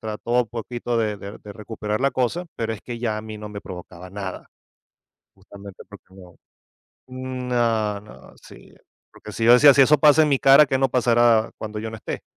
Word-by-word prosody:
trató 110 +1 -7
un 115 - -13
poquito 120 +1 -5
de 110 -2 -1
de 100 +1 -10
de 105 - -11
recuperar 105 +1 -5
la 140 +1 +2
cosa, 135 +9 -2
pero 115 -1 -3
es 110 - -8
que 120 0 -8
ya 110 -2 -2
a - - -5
mí 110 0 -8
no 105 0 -9
me 100 -1 -8
provocaba 90 -1 -11
nada. 100 -1 -7 0.9
Justamente 100 0 -13
porque 100 -1 -14
no. 90 -2 -16 0.7
No, 125 -5 -2
no, 105 +1 -16
sí, - - -17 0.4
porque 105 - -12
si 115 +2 -4
yo 120 - +7
decía: 140 +4 +8
"Si 135 - +5
eso 145 +3 +4
pasa 150 +2 +5
en 150 - +2
mi 140 - +2
cara, 135 +2 +6
¿qué 135 -1 0
no 135 - +2
pasará 120 -2 +2
cuando 110 -1 -6
yo 110 +1 -5
no 110 - -8
esté?". - - -7
115 Hz, 205 wpm, -22 LUFS, 105-125 Hz, 0.9 s, decía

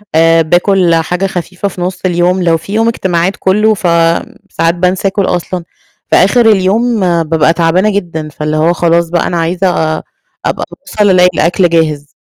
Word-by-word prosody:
آآ 165 +1 +4
بآكُل 175 +1 +2
حاجة 180 +4 -1
خفيفة 185 +1 -4
في 180 -2 -7
نُص 180 +1 -3
اليوم. 180 +1 +1
لو 165 -1 +2
في 195 +5 -9
يوم 225 +1 +1
إجتماعات 190 -5 0
كلّه 210 +3 +2
فساعات 170 0 -1
بانسى 180 +2 0
آكُل 195 0 -1
أصلًا، 180 0 -3 0.5
فآخِر 225 +6 +3
اليوم 215 +4 +1 0.2
بابقى 160 0 +1
تعبانة 170 +4 +1
جدًا، 165 -6 -4
فاللي 150 +1 -3
هو 160 +3 +2
خلاص 170 -1 +1
بقى 175 0 0
أنا 175 - -2
عايزة 175 +3 0
آآ 155 -2 -1 0.4
أبقى - - -2
باوصل 210 -1 -2
ألاقي 180 -1 +4
الأكل 175 +3 +1
جاهز. 155 -3 0
175 Hz, 160 wpm, -11 LUFS, 165-190 Hz, 0.5 s, آآ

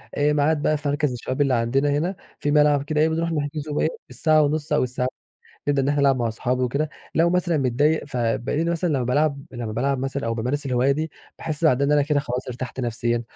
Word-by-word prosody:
آآ، 145 +1 +2
ميعاد 150 +1 +2
بقى 155 +1 +2
في 145 0 -5
مركز 145 -1 0
الشباب 130 +3 -3
اللي 135 -2 +3
عندنا 125 +5 +1
هنا، 160 +7 0 0.2
في 145 - 0
ملعب 150 -1 +4
كده 150 +1 0
إيه 160 - +4
بنروح 165 +1 -1
نحجز 150 0 -3
وإيه، 150 +1 +1 0.2
الساعة 155 +5 +3
ونص 150 +1 0
أو 150 - +3
الساع 125 0 -1 0.6
نبدأ 140 -1 +2
إن 135 - 0
إحنا 145 0 +1
نلعب 140 -1 +4
مع 120 -2 0
اصحابي 125 +3 -1
وكده. 140 +5 0 0.3
لو 165 +1 +3
مثلًا 175 -2 +1
متضايق 145 +4 +1
فبالاقيني 130 +5 -1
مثلًا 170 +1 0
لمّا 135 -3 +1
بالعب 140 +3 +1
لمّا 120 -3 -5
بالعب 135 +4 0
مثلًا، 135 0 -3
أو 115 - 0
بامارس 130 +6 -2
الهواية 130 +1 +2
دي 155 +3 -2 0.3
باحس 155 +1 -3
بعدها 140 -2 +4
إن 145 - +2
أنا 145 -1 +4
كده 145 0 +1
خلاص 125 -2 -4
ارتحت 125 +1 -5
نفسيًا. 120 0 -1
145 Hz, 220 wpm, -23 LUFS, 125-150 Hz, 0.6 s, ملعب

